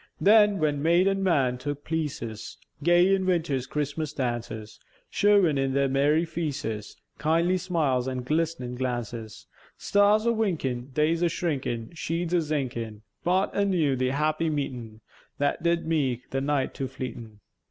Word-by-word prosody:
Then, 210 0 +5
when 150 -4 0
maïd 170 +4 +4
and 195 0 +1
man 135 -9 +2
took 145 +2 -5
pleäces, 145 -9 -4 0.2
Gay 175 +4 +4
in 190 -1 +1
winter's 160 -8 0
Chris'mas 150 +1 -3
dances, 120 -4 -4 0.3
Showèn 200 -8 +4
in 135 0 0
their 140 0 +3
merry 145 +5 +2
feäces 145 -10 -4 0.2
Kindly 165 +4 +2
smiles 150 -8 0
an' 130 -1 -3
glisnèn 155 -5 -1
glances: 120 -3 -4 0.3
Stars 205 +2 +3
a - - +4
winkèn, 150 - -1
Days 155 +4 +1
a 175 - +4
shrinkèn, 135 -9 -3
Sheädes 170 +1 -3
a - - +5
zinkèn, 125 -8 -3 0.2
Brought 185 +3 +1
anew 180 -9 +2
the 130 0 0
happy 155 +4 0
meetèn, 125 -7 -4 0.4
That 145 +3 0
did 170 0 +1
meäke 140 -7 0
the 135 - -1
night 140 -1 0
too 135 - -3
fleetèn. 120 -4 -7
150 Hz, 145 wpm, -26 LUFS, 130-170 Hz, 0.4 s, Then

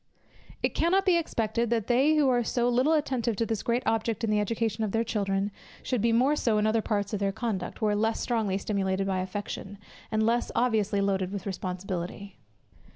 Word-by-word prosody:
It - - +1
cannot 375 +4 +2
be 370 -2 +4
expected, 230 -8 0
that 230 -3 0
they 270 +6 +3
who 295 -3 +4
are 245 -2 +3
so 240 +1 0
little 255 +6 +3
attentive 255 -7 0
to 230 - 0
this 220 -2 -2
great 240 +2 0
object 225 0 0
in 220 - +1
the 210 - +3
education 220 +1 -1
of 210 - -2
their 225 0 +2
children, 200 -2 -1 0.3
should 250 -5 -1
be 230 +1 +3
more 255 +6 +3
so 230 -7 +1
in 210 - +2
other 220 +1 +2
parts 205 -1 -2
of 210 - -1
their 200 -1 +1
conduct, 210 -1 -4
where 210 -1 +2
less 220 +2 0
strongly 220 -5 0
stimulated 195 -1 -1
by 190 -1 0
affection, 200 +1 -5 0.3
and 220 0 +1
less 235 +2 +1
obviously 215 -4 +1
loaded 195 -2 0
with 200 -2 -5
responsibility. 185 0 -5
220 Hz, 200 wpm, -28 LUFS, 200-235 Hz, 0.3 s, be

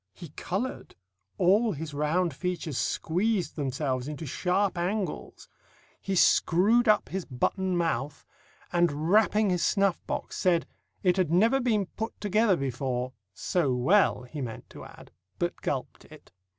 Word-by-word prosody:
He 170 -4 -10
coloured; 195 - -4 0.4
all 205 +5 +3
his 155 0 -6
round 155 +4 0
features 175 -1 -4
squeezed 190 +4 -1
themselves 135 -2 -2
into 150 +2 -6
sharp 185 +7 0
angles; 185 +4 -3 0.5
he 195 - -2
screwed 210 +7 +4
up 215 -1 +3
his 190 0 -3
button 185 +8 -1
mouth, 150 -4 -2 0.5
and 170 -2 +1
rapping 215 -1 +4
his 180 -1 0
snuff 195 -2 +2
box, - - -4
said, 175 -2 +2 0.4
"It 180 -1 +3
had 185 -4 +1
never 225 +10 +4
been 220 -6 +1
put 220 +5 -6
together 210 -1 +2
before" 130 -1 -3 0.2
so 145 -8 0
well 130 +2 +3
he 140 +4 -7
meant 115 -4 -7
to - - -10
add - - -14 0.3
but - - -3
gulped - - -4
it. - - -16
180 Hz, 140 wpm, -28 LUFS, 145-200 Hz, 0.5 s, screwed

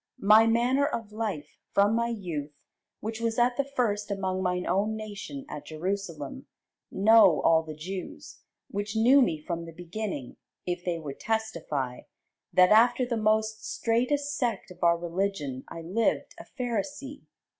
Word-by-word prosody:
My 215 +3 +7
manner 245 +5 +3
of 230 -7 -4
life 205 -9 -4
from 200 +2 +4
my 235 +1 +1
youth, 165 -10 -4 0.5
which 220 +1 -4
was 230 -1 -1
at 245 0 +3
the 280 - +1
first 230 -7 -1
among 190 -2 -2
mine 180 -1 -1
own 200 +4 +1
nation 200 -10 -7
at 145 0 -8
Jerusalem, 165 -3 -4 0.4
know 205 -4 +6
all 160 -1 +5
the 155 -1 -8
Jews; 185 +5 -7 0.3
which 205 +1 -3
knew 250 +5 +6
me 170 -10 +2
from 170 +2 -5
the 165 - -9
beginning, 175 - -6 0.3
if 175 0 -3
they 175 -2 -1
would 145 -4 -7
testify, 170 - -2 0.5
that 180 +1 +5
after 240 +3 +5
the 240 -1 -2
most 220 0 +1
straitest 280 +5 0
sect 240 -7 -2
of 180 - -10
our 170 0 +5
religion 170 -6 -3
I 165 - -8
lived 200 +8 0
a - - -10
Pharisee. 270 +3 -4
205 Hz, 155 wpm, -28 LUFS, 170-230 Hz, 0.5 s, My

